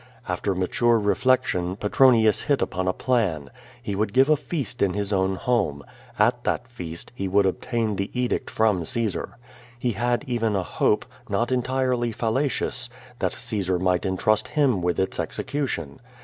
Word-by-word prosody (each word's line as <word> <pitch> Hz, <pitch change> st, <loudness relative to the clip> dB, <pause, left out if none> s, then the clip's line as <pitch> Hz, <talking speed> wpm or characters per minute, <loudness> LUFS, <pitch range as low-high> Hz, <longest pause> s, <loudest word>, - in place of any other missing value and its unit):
After 90 Hz, +2 st, -1 dB
mature 115 Hz, +6 st, +2 dB
reflection, 100 Hz, -4 st, +1 dB
Petronius 110 Hz, +1 st, +4 dB
hit 140 Hz, -2 st, +1 dB
upon 95 Hz, +1 st, -2 dB
a 90 Hz, -, +1 dB
])lan. 95 Hz, -, +1 dB, 0.3 s
lie 100 Hz, -, -2 dB
would 100 Hz, +1 st, -1 dB
give 135 Hz, +3 st, +5 dB
a 155 Hz, -, +6 dB
feast 140 Hz, -4 st, -4 dB
in 95 Hz, -2 st, +2 dB
his 100 Hz, 0 st, -2 dB
own 95 Hz, 0 st, +1 dB
homo. 95 Hz, -13 st, 0 dB, 0.3 s
At -, -, +2 dB
that 120 Hz, -, -1 dB
feast 85 Hz, -9 st, -7 dB
he 100 Hz, -5 st, -3 dB
would 100 Hz, +2 st, +3 dB
obtain 110 Hz, +3 st, -1 dB
the 100 Hz, -, -2 dB
edict 125 Hz, -1 st, -1 dB
tnm\ 110 Hz, -4 st, +2 dB
Caesiir. 110 Hz, +4 st, -2 dB, 0.5 s
lie 125 Hz, -, +2 dB
had 120 Hz, +5 st, 0 dB
even 115 Hz, -5 st, 0 dB
a 95 Hz, -, 0 dB
ho|)e, -, -, +1 dB, 0.3 s
not 120 Hz, +2 st, 0 dB
entirely 125 Hz, -1 st, 0 dB
fallacious, 120 Hz, +1 st, -1 dB, 0.3 s
that -, -, 0 dB
Caosar 95 Hz, -7 st, -1 dB
mijrht 90 Hz, +1 st, +1 dB
entrust 105 Hz, +3 st, +1 dB
him 140 Hz, -10 st, +2 dB
witli 90 Hz, 0 st, 0 dB
its 95 Hz, -, -1 dB
execution. 130 Hz, -, -3 dB
110 Hz, 160 wpm, -24 LUFS, 95-125 Hz, 0.5 s, a